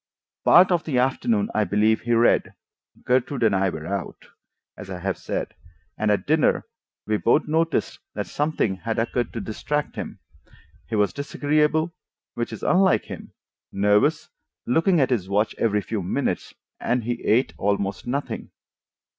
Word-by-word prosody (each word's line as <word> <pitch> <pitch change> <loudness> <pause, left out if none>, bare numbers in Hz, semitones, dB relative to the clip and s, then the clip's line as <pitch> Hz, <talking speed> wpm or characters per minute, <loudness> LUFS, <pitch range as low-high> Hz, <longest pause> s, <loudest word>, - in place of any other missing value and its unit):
Part 185 +2 +7
of 175 -2 +2
the 140 -6 -1
afternoon 205 - +1
I - - +2
believe 110 +2 +2
he 120 +1 0
read—Gertrude 125 +2 0
and 110 -3 +4
I 95 0 +2
were 80 -3 -6
out, 100 +1 -5 0.5
as 105 - -10
I 95 - -5
have 95 +1 -2
said, - - -4 0.4
and 110 - 0
at 100 -2 +1
dinner 155 0 +2 0.4
we 105 0 +1
both 120 +9 +2
noticed 160 +1 0 0.2
that - - -2
something 145 -10 -1
had 110 +4 -3
occurred 120 +2 -1
to 115 - -3
distract 140 +8 -3
him. - - -5 0.7
He 115 - -3
was 105 -1 +2
disagreeable, 150 +3 0 0.4
which 120 0 -3
is 110 - -8
unlike 190 +1 +3
him, - - -9 0.4
nervous, 105 +10 +2 0.4
looking 165 +7 +3
at 135 -2 +2
his 100 -7 0
watch 105 +2 +1
every 105 -2 +2
few 105 0 -3
minutes, 90 - -2 0.2
and 125 0 0
he 120 +1 -3
ate 110 -5 +2
almost 100 +1 -1
nothing. 140 +4 -3
120 Hz, 155 wpm, -24 LUFS, 105-150 Hz, 0.7 s, Part